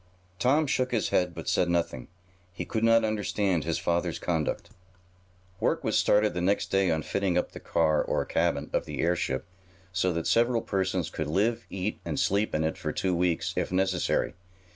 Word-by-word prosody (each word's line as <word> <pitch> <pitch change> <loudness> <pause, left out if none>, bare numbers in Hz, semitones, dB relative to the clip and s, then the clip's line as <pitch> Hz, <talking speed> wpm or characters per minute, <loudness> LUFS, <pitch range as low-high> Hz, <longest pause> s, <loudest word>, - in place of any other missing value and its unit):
Tom 140 +8 +3
shook 130 -2 0
his 115 -3 0
head, 90 -2 +1
but - - -7
said 90 - +2
nothing. 85 -7 -1 0.4
He 90 - -5
could 110 - -2
not 115 0 +5
understand 105 -4 0
his 85 -1 0
father's 85 0 -1
conduct. 80 -4 -2 0.9
Work - - 0
was - - 0
started 105 +1 +3
the 90 - -2
next 100 +3 0
day 95 -1 +3
on 80 -1 0
fitting 95 0 0
up - - 0
the - - -9
car, 80 -2 +2
or - - -1
cabin, 80 -3 0
of - - 0
the - - -6
airship, 85 -6 0 0.5
so 90 0 +1
that 85 0 -2
several 120 0 +2
persons 95 -5 -1
could 80 - -3
live, 105 +9 0
eat 95 +3 -3
and - - -3
sleep 100 -1 +1
in 80 - +1
it 80 - -2
for - - -2
two 95 -2 0
weeks, 85 -1 0
if - - -1
necessary. 95 -1 +1
90 Hz, 185 wpm, -28 LUFS, 85-105 Hz, 0.9 s, not